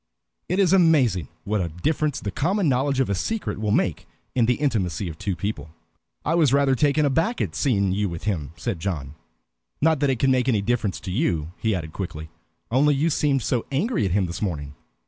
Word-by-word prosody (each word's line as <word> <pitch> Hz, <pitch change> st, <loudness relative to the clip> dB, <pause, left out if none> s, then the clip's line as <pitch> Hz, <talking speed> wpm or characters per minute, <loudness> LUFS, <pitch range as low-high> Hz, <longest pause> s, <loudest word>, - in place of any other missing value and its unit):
It 180 Hz, -, 0 dB
is 190 Hz, -2 st, +4 dB
amazing 140 Hz, -, +4 dB, 0.2 s
what 105 Hz, 0 st, -1 dB
a 85 Hz, -, -1 dB
difference 145 Hz, -, -1 dB
the 100 Hz, -, -4 dB
common 185 Hz, -, 0 dB
knowledge 135 Hz, +1 st, +1 dB
of 135 Hz, -, +2 dB
a 100 Hz, -, 0 dB
secret 220 Hz, -, -2 dB
will 105 Hz, -, 0 dB
make 90 Hz, -6 st, 0 dB, 0.3 s
in 120 Hz, -3 st, +2 dB
the 125 Hz, -, +3 dB
intimacy 100 Hz, -, -1 dB
of 80 Hz, -, -10 dB
two 100 Hz, -3 st, -2 dB
people. 85 Hz, -7 st, -4 dB, 0.6 s
"I 160 Hz, -, +1 dB
was 160 Hz, -6 st, +4 dB
rather 140 Hz, -1 st, +4 dB
taken 145 Hz, +3 st, +2 dB
aback 165 Hz, -, +1 dB
at -, -, -1 dB
seeing 100 Hz, -9 st, +1 dB
you 100 Hz, +1 st, 0 dB
with 85 Hz, -1 st, -7 dB
him," 80 Hz, -9 st, -2 dB
said 85 Hz, +2 st, -3 dB
John. 80 Hz, -7 st, -3 dB, 0.7 s
"Not 160 Hz, -1 st, +3 dB
that 145 Hz, -1 st, +2 dB
it 130 Hz, -, +1 dB
can 135 Hz, +3 st, +2 dB
make 130 Hz, 0 st, +2 dB
any 105 Hz, -5 st, +2 dB
difference 110 Hz, -3 st, 0 dB
to 95 Hz, -, -5 dB
you," 85 Hz, -, 0 dB
he 110 Hz, -2 st, +1 dB
added 80 Hz, -3 st, -5 dB
quickly, 80 Hz, -5 st, -6 dB, 0.4 s
"only 145 Hz, +4 st, +4 dB
you 155 Hz, +4 st, +1 dB
seemed 140 Hz, -4 st, +1 dB
so 120 Hz, -3 st, -1 dB
angry 195 Hz, -, 0 dB
at 95 Hz, -, -1 dB
him 100 Hz, -1 st, +2 dB
this 85 Hz, 0 st, -6 dB
morning." 75 Hz, -8 st, -3 dB
115 Hz, 210 wpm, -24 LUFS, 90-145 Hz, 0.7 s, is